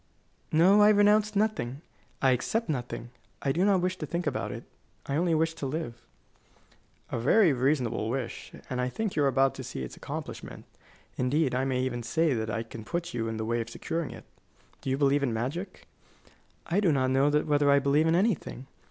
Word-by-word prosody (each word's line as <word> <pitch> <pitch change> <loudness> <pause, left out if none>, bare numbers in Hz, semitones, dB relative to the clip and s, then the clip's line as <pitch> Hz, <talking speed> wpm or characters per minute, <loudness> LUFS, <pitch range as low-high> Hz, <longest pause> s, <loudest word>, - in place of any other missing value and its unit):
"No; 185 +6 +6
I 210 - +7
renounce 210 0 +4
nothing, 195 - 0 0.4
I 135 - +5
accept 220 - 0
nothing. 120 -3 -4 0.3
I 140 - +2
do 170 +7 +1
not 195 -2 +3
wish 185 +1 -1
to - - -4
think 175 0 -2
about 150 - -2
it. - - -7 0.4
I 140 - -2
only 170 +1 +2
wish 160 +1 +1
to 160 -4 -4
live." 155 -2 -3 1.2
"A - - -1
very 160 - +4
reasonable 125 -4 0
wish, 125 -1 -4 0.2
and 125 -1 -2
I 125 - 0
think 215 - -3
you 150 - +2
are - - +4
about 135 0 +3
to - - -7
see 65 - -5
its 65 - -7
accomplishment. - - -7 0.5
Indeed, 130 +2 +1
I 130 +1 0
may 130 -1 0
even 120 -2 -2
say 150 +6 +1
that 110 -2 -2
I 110 +1 -2
can 115 -1 -9
put 170 +7 -4
you 115 -1 -2
in 110 0 -3
the 110 - -3
way 115 +1 0
of 115 - -6
securing 165 -2 -3
it. - - -10 0.6
Do - - -4
you 130 - +1
believe 140 0 +3
in 125 -5 0
magic?" 140 - -4 0.8
"I 175 +4 +1
do 190 -5 +3
not 130 -2 +1
know 135 +2 +3
whether 145 -1 +2
I 140 - +6
believe 140 +3 +3
in 165 - +3
anything. 185 - 0
140 Hz, 205 wpm, -28 LUFS, 125-170 Hz, 1.2 s, I